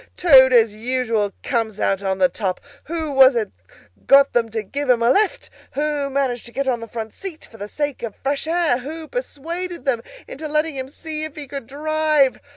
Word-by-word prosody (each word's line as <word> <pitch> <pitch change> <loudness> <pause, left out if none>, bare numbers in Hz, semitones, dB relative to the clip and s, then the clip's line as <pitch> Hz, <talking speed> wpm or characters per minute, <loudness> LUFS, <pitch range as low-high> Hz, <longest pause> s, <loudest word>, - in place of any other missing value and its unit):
Toad, 265 -7 +7
as 225 -4 +5
usual, 225 -2 -1
comes 225 -4 -1
out 195 0 +1
on 190 -1 -1
the 185 -1 +4
top! 185 +1 -3 0.3
Who 320 -2 -3
was 265 -1 +6
it 225 -2 -1 0.6
got 275 0 +6
them 230 -1 +1
to 220 0 -3
give 280 +7 -4
him 235 -2 +4
a 235 - +5
lift? 430 - +1 0.2
Who 295 -1 -1
managed 265 -4 -1
to - - -11
get 275 +2 -2
on 245 -3 +1
the 230 - -8
front 220 -1 -6
seat 375 -5 -8
for 225 - -16
the 205 - -6
sake 290 +4 -3
of 225 -4 -5
fresh 280 +3 -3
air? 330 -6 +1
Who 310 +5 -7
persuaded 350 - -5
them 245 -4 +1 0.3
into 310 +3 -6
letting 305 0 0
him 260 0 -4
see 310 +1 -6
if 310 -1 -6
he 300 -2 -6
could 275 -3 -7
drive? 305 -1 +1
270 Hz, 205 wpm, -21 LUFS, 230-310 Hz, 0.6 s, Toad